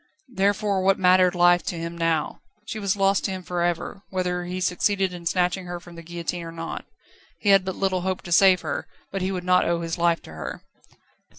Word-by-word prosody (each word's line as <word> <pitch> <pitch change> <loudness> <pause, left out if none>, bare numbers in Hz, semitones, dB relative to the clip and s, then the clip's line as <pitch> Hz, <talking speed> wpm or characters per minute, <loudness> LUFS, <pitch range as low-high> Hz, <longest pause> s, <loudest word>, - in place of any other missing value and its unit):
Therefore 200 -1 +1
what 195 +1 +3
mattered 185 -1 +4
life 175 0 +5
to 175 - -2
him 170 +1 -5
now? 165 -2 -1 0.2
She 220 - -5
was 200 -2 0
lost 195 0 +2
to - - 0
him 185 -1 -5
for 175 0 -3
ever, 175 +3 -2
whether 180 -1 -2
he 180 +1 -4
succeeded 190 +1 +1
in 170 -1 -6
snatching 180 +1 0
her 175 0 -5
from 175 0 -14
the 170 - -9
guillotine 170 +1 -4
or 165 0 -7
not. 165 0 -6 0.5
He 205 - -1
had 195 -1 +6
but 190 0 -4
little 190 -2 0
hope 185 0 -2
to 175 - -8
save 185 +1 +6
her, - - -4 0.2
but 195 - -3
he 185 +1 -1
would 180 -2 -3
not 180 0 +3
owe 170 0 0
his 165 +1 -4
life 170 -1 +2
to - - -12
her. 75 -4 -7
180 Hz, 220 wpm, -24 LUFS, 170-190 Hz, 0.5 s, had